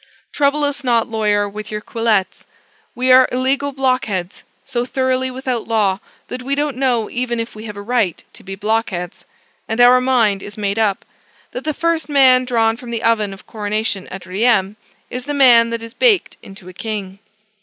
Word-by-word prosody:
Trouble 290 +1 +1
us 285 -1 -2
not, 235 -2 +2
lawyer, 210 -2 +1
with 210 +1 -8
your 210 - -4
quillets. 215 -4 -1 0.5
We 255 +1 +1
are 255 0 +7
illegal 270 +3 0
blockheads; 255 -9 -1 0.2
so 240 -1 -2
thoroughly 260 0 -1
without 255 -2 -4
law, 205 -4 +1 0.3
that 250 - -6
we 275 +2 -1
don't 290 -1 -1
know 245 -4 0
even 240 -1 -2
if 230 0 -4
we 215 +1 -10
have 210 -2 -8
a 200 - -7
right 220 -6 0
to - - -11
be 195 0 -7
blockheads; 195 -4 -2 0.4
and 225 +2 -2
our 250 +1 +7
mind 230 -6 +2
is 205 +1 -10
made 205 0 -1
up 205 -3 0 0.5
that 250 - -7
the 310 -2 -2
first 330 -2 -1
man 260 -3 +5
drawn 225 -2 +1
from 245 -1 -10
the 230 -1 -4
oven 215 -3 +2
of 195 - -12
coronation 210 -2 -3
at 190 0 -9
Rheims, 195 +1 +1 0.4
is 250 0 -5
the 290 0 -3
man 240 -4 +6
that 230 0 -4
is 230 0 -9
baked 430 - +2
into 195 -2 -13
a 185 - -10
king. 200 -1 -6
230 Hz, 185 wpm, -18 LUFS, 205-255 Hz, 0.5 s, are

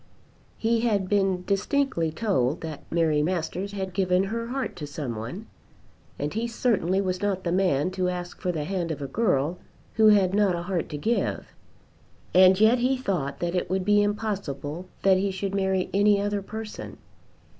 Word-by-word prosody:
He 230 +1 +1
had 210 -5 +1
been 195 -2 +1
distinctly 200 - 0
told 160 - 0
that 160 -3 -6
Mary 160 -3 +2
Masters 180 +4 -2
had 190 -2 -4
given 185 -1 +2
her 230 +4 -3
heart 265 +2 -3
to 150 -4 -5
some 145 -5 -5
one, 120 - -6 0.7
and 145 +1 -3
he 225 +2 -1
certainly 205 -6 +1
was 185 -1 -1
not 195 -2 -1
the 170 - -1
man 180 -3 +2
to 185 -1 -1
ask 180 -1 -6
for 180 - 0
the 155 -3 -3
hand 175 0 -2
of 150 -3 -4
a - - -3
girl 170 - 0 0.3
who 220 -1 +5
had 195 -3 +5
not 200 -3 +3
a 170 - -4
heart 180 -2 -2
to 150 - -4
give. 225 +11 -1 0.8
And 185 +1 +7
yet 220 +3 +5
he 260 +2 +2
thought 180 - -2
that 175 0 -1
it 180 -1 -1
would 190 0 -1
be 205 0 +4
impossible 190 -7 -3 0.2
that 190 -1 +5
he 200 +1 0
should 195 +1 -3
marry 190 -1 0
any 205 +1 +4
other 205 0 -1
person. 220 +2 -7
190 Hz, 180 wpm, -26 LUFS, 170-205 Hz, 0.8 s, And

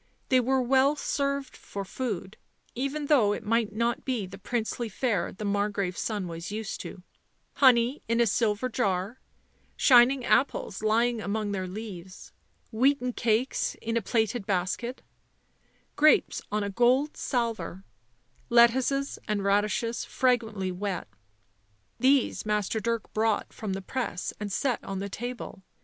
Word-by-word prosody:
They 255 - +5
were 260 +1 +2
well 265 +3 +4
served 280 -2 -2
for 200 -1 -7
food, 210 -4 -4 0.4
even 275 +4 -2
though 245 -9 +4
it - - -6
might 230 0 +1
not 235 +3 -1
be 245 -7 -1
the 195 +1 -11
princely 230 +2 -2
fare 225 +1 -1
the 210 +2 -7
Margrave's 200 -2 -1
son 205 -5 -2
was 170 +2 -6
used 215 -1 -4
to; 180 - -9 0.5
honey 250 0 +4
in 230 +1 +1
a 235 - +5
silver 220 +2 +1
jar, 200 0 -1 0.6
shining 250 0 +6
apples 230 -6 +1
lying 230 +2 +2
among 205 0 -2
their 190 -2 -2
leaves, 190 -2 -8 0.4
wheaten 250 +2 +2
cakes 230 +3 0
in 230 0 -3
a 230 - +2
plaited 220 0 0
basket, 200 +6 -2 0.9
grapes 305 +1 +4
on 210 0 0
a 200 - -3
gold 250 +7 +2
salver, 225 -7 -2 0.7
lettuces 255 +4 +3
and 210 -2 -1
radishes 210 +4 +1
fragrantly 225 -7 0
wet; 190 +1 -3 0.9
these 265 0 +3
Master 210 0 0
Dirk 230 +1 -3
brought 220 -1 0
from 210 -3 -4
the 195 0 -5
press 230 -5 -3
and 205 -1 -4
set 250 +4 -1
on 195 - -5
the 200 +1 -4
table. 240 -2 -6
225 Hz, 140 wpm, -28 LUFS, 200-250 Hz, 0.9 s, shining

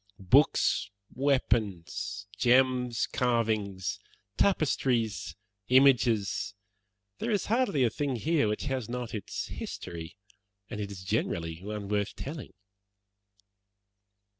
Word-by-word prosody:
Books, 95 0 +3 0.2
weapons, 110 -9 0
gems, 125 +1 +3
carvings, 110 -7 0 0.4
tapestries, 130 - +1 0.3
images 120 -6 +3 0.6
there 230 - -2
is 205 -3 +1
hardly 220 - +2
a 120 - +3
thing 140 -3 -1
here 150 +1 +1
which 105 0 -2
has 130 -5 -2
not 125 -1 -4
its 105 -4 -4
history, 85 +1 -7 0.5
and 105 - -4
it 100 - -4
is 95 -2 -8
generally 85 -5 -2
one 105 0 -5
worth 105 0 -1
telling." 145 -2 -7
115 Hz, 100 wpm, -29 LUFS, 100-130 Hz, 0.6 s, Books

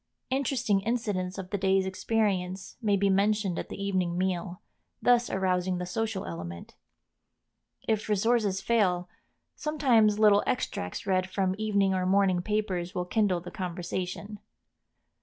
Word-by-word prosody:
Interesting 255 -6 +1
incidents 200 -4 -2
of 190 -1 -7
the 200 - -1
day's 190 0 +2
experience 190 -2 -1
may 205 -3 +2
be 200 +1 +2
mentioned 200 -1 +1
at - - -6
the - - -7
evening 185 -3 -1
meal, 185 0 -2 0.4
thus 245 -1 +3
arousing 185 -1 0
the 180 - -3
social 215 +2 -2
element. 85 0 -7 1.1
If 215 -1 0
resources 210 -2 +2
fail 190 -5 +1 0.5
sometimes 245 -9 +3
little 210 -1 +5
extracts 90 - -2
read 185 -1 +1
from 190 -1 0
evening 200 -3 +2
or 185 -1 0
morning 190 -2 +3
papers 185 -3 -2
will 180 - -1
kindle 190 -2 +1
the 180 - -9
conversation. 180 +3 -4
195 Hz, 135 wpm, -28 LUFS, 180-215 Hz, 1.1 s, little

